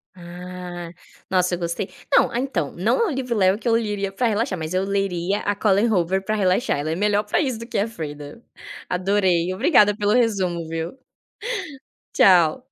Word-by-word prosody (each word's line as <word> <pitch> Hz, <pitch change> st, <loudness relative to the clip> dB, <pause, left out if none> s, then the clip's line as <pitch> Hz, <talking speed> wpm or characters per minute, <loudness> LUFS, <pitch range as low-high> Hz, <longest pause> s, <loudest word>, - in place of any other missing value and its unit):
Ah. 180 Hz, 0 st, -8 dB, 0.4 s
Nossa, 180 Hz, -1 st, +1 dB
eu -, -, -8 dB
gostei 170 Hz, +3 st, -3 dB, 0.3 s
não, -, -, +5 dB
ah 235 Hz, -, -2 dB
então, 270 Hz, +1 st, -2 dB
não -, -, 0 dB
é 460 Hz, -, +3 dB
um -, -, -1 dB
livro 250 Hz, -3 st, -2 dB
leve 190 Hz, -1 st, +3 dB
que 235 Hz, -, -6 dB
eu 230 Hz, -, +3 dB
leria 205 Hz, -4 st, -1 dB
para 240 Hz, +5 st, 0 dB
relaxar, 215 Hz, -4 st, -1 dB
mas 160 Hz, +1 st, -5 dB
eu 185 Hz, -, +1 dB
leria 195 Hz, -1 st, -1 dB
a 205 Hz, -, -1 dB
Colleen 210 Hz, +2 st, +2 dB
Hoover 190 Hz, 0 st, +1 dB
para 215 Hz, +2 st, -1 dB
relaxar, 190 Hz, -, +1 dB
ela 150 Hz, +2 st, -2 dB
é 160 Hz, -, -1 dB
melhor 205 Hz, +2 st, +1 dB
para 210 Hz, -, 0 dB
isso 260 Hz, -7 st, -1 dB
do 230 Hz, -, -8 dB
que -, -, -2 dB
a 205 Hz, -, +1 dB
Freida. 150 Hz, -1 st, -8 dB, 0.4 s
Adorei, 185 Hz, -2 st, +1 dB
obrigada 205 Hz, -, +4 dB
pelo 205 Hz, 0 st, +1 dB
resumo, 190 Hz, -8 st, +1 dB
viu. 165 Hz, +1 st, -4 dB, 1.2 s
Tchau. 180 Hz, +4 st, +5 dB
195 Hz, 190 wpm, -22 LUFS, 175-215 Hz, 1.2 s, não